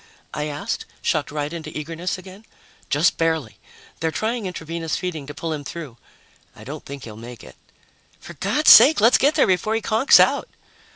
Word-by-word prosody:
_" - - -27 0.3
I 150 - -3
asked, 145 0 -4 0.2
shocked 150 -2 0
right 150 +1 -4
into 160 -2 -7
eagerness 165 +4 -4
again. 190 +3 -13 0.5
"Just 150 +5 +2
barely. 160 -11 -1 0.4
They're 160 - 0
trying 220 +4 -3
intravenous 165 -2 -4
feeding 160 -6 -5
to 145 - -9
pull 165 -1 -4
him 150 -2 -6
through. 140 -3 -8 0.6
I - - -13
don't - - -8
think 140 -1 -9
he'll 110 -2 -9
make 120 0 -11
it." 65 - -14 0.6
"For 170 - -11
God's 205 - +3
sake, 300 +3 +8
let's 230 +4 +5
get 290 +3 +3
there - - +4
before 190 +4 0
he 225 - -1
conks 230 +6 +5
out!" - - +2
165 Hz, 185 wpm, -22 LUFS, 145-190 Hz, 0.6 s, sake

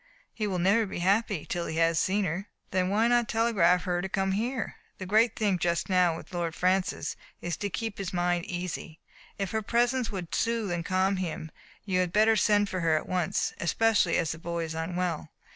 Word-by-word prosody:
He 215 -2 -2
will 190 -2 -1
never 200 +5 +3
be - - -5
happy 195 -1 +1
till 175 -1 -3
he 160 - -4
has 165 -1 +3
seen 200 +1 +1
her." 185 +5 -3 0.2
"Then 185 0 +1
why 215 +4 +3
not 240 -2 +2
telegraph 200 -6 +3
to 185 - -5
her 175 0 +1
to 190 - -4
come 195 0 0
here? 230 +4 -2 0.2
The 190 - -6
great 220 +4 +3
thing 205 -5 +1
just 170 +1 0
now 180 -3 +3
with - - -12
Lord 170 -2 -2
Francis 185 -4 0 0.2
is 175 -1 -3
to 205 - -2
keep 225 +2 -4
his 195 -2 -3
mind 175 -1 0
easy. 175 -2 -5 0.4
If 195 -2 -3
her 220 - 0
presence 240 +3 +1
would 180 -4 -6
soothe 230 -4 0
and 175 -1 -2
calm 190 +2 +1
him 165 -3 -4 0.3
you 185 -3 +1
had 180 -2 +1
better 220 +3 +4
send 205 -1 +3
for 185 -2 -3
her 165 -2 +2
at - - -5
once, 180 -3 0
especially 195 +2 +2
as 165 - 0
the 160 - -6
boy 170 0 -3
is 160 -1 -4
unwell. 165 -1 -2
185 Hz, 210 wpm, -28 LUFS, 170-210 Hz, 0.4 s, better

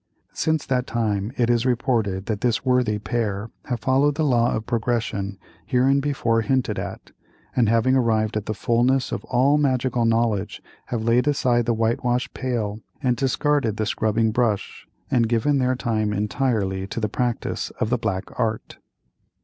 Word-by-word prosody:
Since 160 -2 0
that 125 -1 0
time 110 -2 -1
it 120 - +2
is 120 -1 +2
reported 115 -6 0
that 105 -2 -3
this 120 0 0
worthy 125 -4 +2
pair 110 -1 -2
have 120 -4 -3
followed 135 +4 +2
the 155 - 0
law 120 -4 +2
of 110 - -4
progression 115 -5 -2 0.3
hereinbefore 130 -2 +2
hinted 130 +2 0
at, - - -7 0.4
and 120 -4 +3
having 115 +3 +3
arrived 110 -4 +1
at 105 -1 -3
the 110 - -2
fulness 125 +4 +1
of - - -3
all 135 +4 +3
magical 130 -4 +1
knowledge, 115 -3 0 0.3
have 115 -3 -2
laid 120 +4 +2
aside 120 -5 +2
the 120 - +2
whitewash 120 +3 0
pail 115 -5 -2 0.2
and 125 -2 +2
discarded 135 -2 0
the 110 - 0
scrubbing 110 +1 +1
brush, 110 -3 -1 0.2
and 115 -3 +2
given 130 +5 +2
their 130 0 +1
time 110 -4 -1
entirely 105 -3 -1
to 110 - -4
the 110 - 0
practice 120 +2 -2
of 110 - -1
the 125 - +3
Black 100 -5 -1 0.2
Art. 110 -2 -2
120 Hz, 160 wpm, -23 LUFS, 110-130 Hz, 0.4 s, and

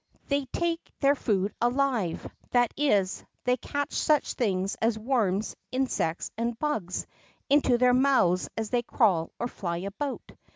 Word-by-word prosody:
They 280 -1 +1
take 335 +5 -2
their 280 0 +5
food 205 -7 0
alive; 240 -7 0 0.2
that 245 -2 +2
is, 205 -10 +1 0.2
they 250 0 +3
catch 285 +3 -3
such 305 -1 +2
things 195 -5 0
as 225 0 +2
worms, 220 -4 0 0.2
insects, 255 -10 -1
and 235 0 -1
hugs 220 - -2 0.5
into 275 -4 +4
their 250 0 +4
mouths 250 -9 +3
as 220 -1 -3
they 245 -1 +2
crawl 195 -9 +2
or 240 - -1
fly 170 -7 -4
about. 200 +10 -5
240 Hz, 140 wpm, -28 LUFS, 195-275 Hz, 0.5 s, their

